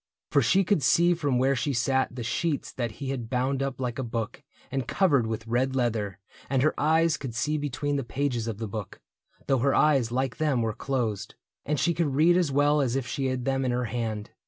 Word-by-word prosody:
For 140 - +4
she 185 +11 +3
could 190 -3 +1
see 175 +5 +4
from 145 -7 0
where 135 +2 +3
she 140 +3 -1
sat 130 +1 +1
The 125 - -4
sheets 155 +5 -2
that 120 -3 -3
he 135 -2 -5
had 120 -4 -4
bound 130 +2 0
up 135 -2 -3
like 125 -1 -3
a - - -1
book 115 -2 -4 0.3
And 135 -2 -2
covered 145 - +2
with 110 0 -4
red 125 +3 0
leather; 110 -6 -1 0.3
and 135 -1 +2
her 155 - +3
eyes 160 +2 +3
Could 125 -5 -6
see 150 +5 0
between 145 0 -2
the 140 - -2
pages 120 -1 -2
of 110 -3 -3
the 110 0 -4
book, 105 -1 -6 0.5
Though 135 -2 +2
her 135 +3 +2
eyes, 135 -7 +3
like 130 +1 -1
them, 145 -6 +1
were 110 -1 -1
closed. 115 -6 -3 0.3
And 150 0 0
she 170 - +2
could 155 -5 0
read 165 +4 +5
As 175 -5 +2
well 145 +2 +3
as 130 -2 0
if 135 -2 -1
she 135 +2 -2
had 130 -1 -2
them 135 0 0
in 130 - 0
her 125 0 0
hand. 110 -3 -3
130 Hz, 230 wpm, -27 LUFS, 120-145 Hz, 0.5 s, read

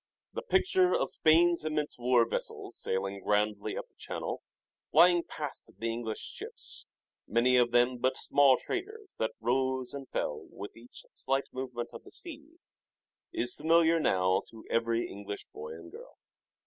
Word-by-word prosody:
The 480 - -3
picture 375 -3 +3
of - - 0
Spain's 170 +2 +4
immense 150 -3 -1
war 120 -1 +4
vessels - - -4
sailing 95 +1 -2
grandly 105 0 0
up - - -5
the - - -42
Channel, - - -4 0.5
flying 175 0 +7
past 150 -4 -6
the 115 0 -1
English 115 -1 -4
ships, - - -4 0.4
many 120 +3 +3
of 120 -1 +5
them 120 +1 +3
but 130 +1 +1
small 140 -2 +5
traders 410 +2 -5
that 110 0 0
rose 130 +2 0
and 140 -1 -7
fell - - -3
with 100 - -9
each 120 +2 -12
slight 135 +1 -1
movement 125 -2 -4
of 115 - -9
the - - -14
sea, 315 -1 -7 0.8
is 350 +1 0
familiar 165 0 +4
now 95 -9 +3
to 115 -1 -13
every 115 0 +1
English 100 0 -7
boy 75 +1 -7
and 85 +1 -11
girl. - - -12
125 Hz, 155 wpm, -31 LUFS, 115-165 Hz, 0.8 s, flying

